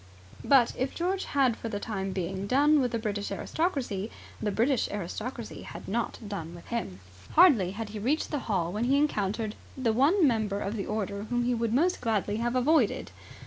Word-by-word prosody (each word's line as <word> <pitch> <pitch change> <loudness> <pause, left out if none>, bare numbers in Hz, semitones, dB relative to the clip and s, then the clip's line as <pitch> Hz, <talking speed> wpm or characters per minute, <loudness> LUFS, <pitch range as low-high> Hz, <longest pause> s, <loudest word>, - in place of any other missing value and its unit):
But 265 -4 +5
if 260 +1 -1
George 375 +3 -1
had 265 -5 +2
for 230 - -6
the 205 -2 -3
time 195 -3 -3
being 190 +1 -3
done 290 +5 +4
with 250 -3 +1
the 230 - 0
British 205 -3 -3
aristocracy, 240 - -2 0.3
the 215 - 0
British 235 +5 +1
aristocracy 215 +5 -5
had - - -9
not 230 +4 -1
done 170 -5 -5
with 170 - -12
him. 95 - -3 0.3
Hardly 285 - +6
had 225 -2 -4
he 210 0 -6
reached 270 +9 0
the 295 - 0
hall 175 -5 +1
when 215 +3 0
he 270 +3 +3
encountered 215 -6 0 0.2
the 240 -4 +1
one 300 - +4
member 215 -5 0
of 205 +2 -3
the 200 - -3
order 205 -1 -3
whom 240 +2 0
he 245 +1 +1
would 230 -1 0
most 335 +10 +2
gladly 215 -3 0
have 240 +2 -1
avoided. 300 +6 +2
230 Hz, 190 wpm, -28 LUFS, 205-265 Hz, 0.3 s, Hardly